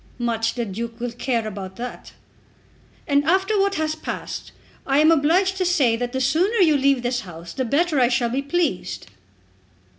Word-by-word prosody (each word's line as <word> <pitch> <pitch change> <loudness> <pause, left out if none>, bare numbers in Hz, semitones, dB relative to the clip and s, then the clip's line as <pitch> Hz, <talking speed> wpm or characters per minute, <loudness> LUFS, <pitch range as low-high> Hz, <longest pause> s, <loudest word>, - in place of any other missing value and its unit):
"Much 230 -2 -1
the 240 -2 -2
Duke 230 +3 -6
will 245 0 -3
care 235 -2 -2
about 190 -2 -7
that." 245 +1 -8 0.9
"And 285 0 +3
after 385 +6 +2
what 395 0 +2
has 310 0 -1
passed 315 - -6 0.4
I 275 0 +2
am 310 +2 +6
obliged 345 +5 +3
to 375 - +1
say 285 -10 +3
that 245 +1 -3
the 260 - -2
sooner 325 - +2
you 335 -7 +5
leave 275 -2 +2
this 245 0 0
house 170 -1 -10
the 260 - -2
better 300 +4 +1
I 245 - +5
shall 240 -1 0
be 265 +3 0
pleased." 280 - -2
265 Hz, 180 wpm, -22 LUFS, 235-320 Hz, 0.9 s, am